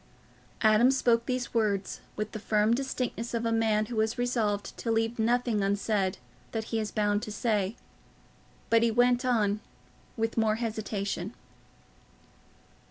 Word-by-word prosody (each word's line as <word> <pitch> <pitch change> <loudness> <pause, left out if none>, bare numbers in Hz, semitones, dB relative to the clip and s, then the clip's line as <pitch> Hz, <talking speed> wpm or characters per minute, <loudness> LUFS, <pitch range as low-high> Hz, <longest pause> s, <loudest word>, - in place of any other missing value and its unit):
Adam 220 +3 +6
spoke 235 -3 +2
these 255 -1 -2
words 205 -4 0 0.2
with 215 0 -3
the 215 - -5
firm 215 +1 +2
distinctness 245 -2 -2
of 230 0 -1
a 230 - +1
man 220 -1 +2
who 220 -1 -1
is 220 +1 -1
resolved 225 -5 -1
to 235 - -4
leave 225 +1 0
nothing 235 -1 +2
unsaid 200 -1 0 0.4
that 225 -1 -1
he 225 - +2
is 215 -1 -2
bound 205 0 +1
to 215 - -6
say; 210 -1 0 1.0
but 230 0 +6
he 230 - +3
went 245 +2 +3
on 215 -5 +2 0.6
with 225 +1 -1
more 215 -1 +3
hesitation. 215 -3 -3
225 Hz, 145 wpm, -29 LUFS, 210-235 Hz, 1.0 s, Adam